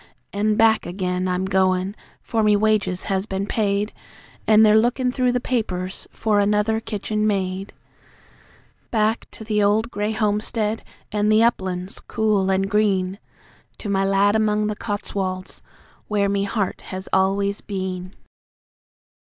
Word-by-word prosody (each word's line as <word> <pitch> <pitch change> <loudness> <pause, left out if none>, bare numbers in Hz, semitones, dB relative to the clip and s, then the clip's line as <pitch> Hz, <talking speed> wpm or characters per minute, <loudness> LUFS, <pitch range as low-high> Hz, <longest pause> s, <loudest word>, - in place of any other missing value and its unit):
An' 210 +1 +1
back 220 -2 +3
again 180 0 -2
I'm 180 +1 0
goin' 190 0 +1 0.3
(for 225 - 0
me 210 -1 +4
wages 210 -3 +1
has 195 0 -1
been 195 -1 -2
paid, 205 0 0 0.5
An' 220 0 +7
they're 215 0 +6
lookin' 250 +2 +1
through 250 -1 +1
the 250 - +1
papers 190 -7 -3
for 215 -2 +1
another 210 +2 +2
kitchen 215 -1 -2
maid). 195 -1 -1 1.2
Back 220 0 0
to - - -11
the 210 -1 0
old 215 +4 +2
grey 210 +1 -1
homestead, 215 +1 -1 0.3
an' 210 0 +1
the 215 +1 +5
uplands 190 -4 -1
cool 210 -4 0
an' 190 0 +2
green, 195 -2 +1 0.6
To 210 - -6
my 195 -1 +2
lad 195 +1 +3
among 215 -1 +2
the 210 0 -1
Cotswolds, 195 -3 -4 0.5
where 200 -1 +1
me 200 0 0
heart 200 -1 -2
has 190 0 -6
always 200 +1 +1
been! 185 -2 -5
205 Hz, 140 wpm, -22 LUFS, 190-215 Hz, 1.2 s, An